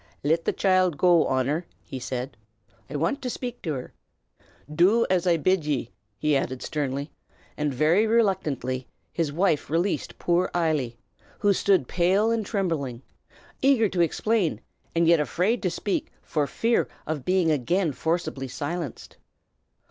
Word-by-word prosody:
"Lit 160 Hz, +3 st, +1 dB
the -, -, +2 dB
choild 185 Hz, -4 st, +2 dB
go, 175 Hz, -1 st, +4 dB
Honor," 135 Hz, +6 st, 0 dB, 0.2 s
he 130 Hz, -, -7 dB
said. 130 Hz, +1 st, -4 dB, 0.5 s
"I 145 Hz, -, -6 dB
want 165 Hz, -, 0 dB
to 255 Hz, -, -3 dB
shpake 245 Hz, 0 st, -5 dB
till 155 Hz, -4 st, -2 dB
her. 125 Hz, -, -7 dB, 0.8 s
Do 200 Hz, +9 st, +4 dB
as 185 Hz, -1 st, +2 dB
I 170 Hz, -1 st, +4 dB
bid 185 Hz, +2 st, +2 dB
ye!" 145 Hz, -5 st, -2 dB, 0.3 s
he 150 Hz, -1 st, +1 dB
added 130 Hz, -1 st, -2 dB
sternly; 140 Hz, -1 st, -3 dB, 0.4 s
and 150 Hz, -1 st, -1 dB
very 160 Hz, -, +3 dB
reluctantly 150 Hz, -, 0 dB, 0.3 s
his 165 Hz, -4 st, -1 dB
wife 165 Hz, -1 st, +1 dB
released 170 Hz, +5 st, -1 dB
poor 175 Hz, +1 st, +1 dB
Eily, 150 Hz, -9 st, 0 dB, 0.4 s
who 205 Hz, -1 st, +3 dB
stood 190 Hz, -8 st, +2 dB
pale 190 Hz, +6 st, +2 dB
and 230 Hz, -1 st, 0 dB
trembling, 160 Hz, -, -2 dB, 0.6 s
eager 265 Hz, -5 st, +4 dB
to 180 Hz, -2 st, 0 dB
explain, 170 Hz, -, +1 dB, 0.4 s
and 165 Hz, 0 st, +3 dB
yet 170 Hz, -1 st, +6 dB
afraid 185 Hz, +10 st, 0 dB
to 185 Hz, -, +1 dB
speak 190 Hz, +3 st, -2 dB
for 150 Hz, -2 st, -1 dB
fear 230 Hz, +8 st, +1 dB, 0.2 s
of 150 Hz, -3 st, -3 dB
being 180 Hz, -1 st, +2 dB
again 160 Hz, +5 st, +1 dB
forcibly 155 Hz, -2 st, -2 dB
silenced. 145 Hz, +2 st, -5 dB
165 Hz, 150 wpm, -26 LUFS, 145-190 Hz, 0.8 s, yet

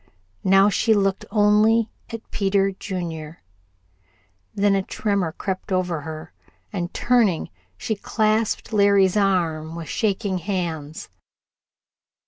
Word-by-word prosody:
Now 195 Hz, +1 st, +5 dB
she 220 Hz, +2 st, +2 dB
looked 195 Hz, -1 st, 0 dB
only 215 Hz, +2 st, +3 dB, 0.2 s
at 230 Hz, -1 st, -8 dB
Peter 195 Hz, 0 st, +1 dB
Junior. 165 Hz, -, -6 dB, 1.1 s
Then 200 Hz, 0 st, +3 dB
a 195 Hz, -, +2 dB
tremor 200 Hz, -3 st, -1 dB
crept 190 Hz, +3 st, -5 dB
over 180 Hz, -4 st, 0 dB
her, 155 Hz, +2 st, -8 dB, 0.4 s
and, 175 Hz, -2 st, -3 dB
turning, 230 Hz, -, +1 dB, 0.3 s
she 220 Hz, -, -2 dB
clasped 215 Hz, +2 st, 0 dB
Larry's 200 Hz, -2 st, +4 dB
arm 165 Hz, -6 st, 0 dB
with 165 Hz, -3 st, -7 dB
shaking 200 Hz, -3 st, -1 dB
hands. 165 Hz, -5 st, -4 dB
195 Hz, 110 wpm, -23 LUFS, 170-210 Hz, 1.1 s, Now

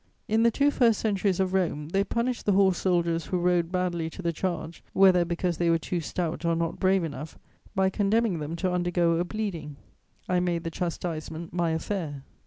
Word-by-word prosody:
In 220 Hz, +1 st, +2 dB
the 235 Hz, -, +5 dB
two 285 Hz, +5 st, +2 dB
first 230 Hz, -6 st, +3 dB
centuries 200 Hz, -3 st, 0 dB
of 190 Hz, -1 st, +1 dB
Rome, 160 Hz, -5 st, 0 dB
they 195 Hz, +3 st, +2 dB
punished 235 Hz, +3 st, -2 dB
the 205 Hz, -, +4 dB
horse 190 Hz, -2 st, +4 dB
soldiers 170 Hz, -3 st, +1 dB
who 185 Hz, -, 0 dB
rode 175 Hz, -1 st, +1 dB
badly 175 Hz, -3 st, -1 dB
to 185 Hz, -, -9 dB
the 170 Hz, 0 st, 0 dB
charge, 165 Hz, -1 st, -4 dB
whether 190 Hz, -2 st, +6 dB
because 170 Hz, 0 st, -1 dB
they 170 Hz, -1 st, +1 dB
were 165 Hz, -, +4 dB
too 175 Hz, +2 st, -3 dB
stout 170 Hz, +1 st, -3 dB
or 170 Hz, 0 st, +2 dB
not 165 Hz, 0 st, -2 dB
brave 190 Hz, -1 st, +3 dB
enough, 155 Hz, 0 st, -6 dB, 0.4 s
by 190 Hz, 0 st, +2 dB
condemning 205 Hz, -2 st, +1 dB
them 150 Hz, +2 st, -4 dB
to 185 Hz, +2 st, -1 dB
undergo 175 Hz, -1 st, +1 dB
a 175 Hz, -, +1 dB
bleeding: 175 Hz, -7 st, -4 dB, 0.5 s
I 180 Hz, -1 st, +2 dB
made 175 Hz, -2 st, -1 dB
the 165 Hz, -, -4 dB
chastisement 165 Hz, -2 st, -4 dB
my 175 Hz, -1 st, +1 dB
affair. 160 Hz, -4 st, -3 dB
175 Hz, 195 wpm, -27 LUFS, 165-190 Hz, 0.5 s, whether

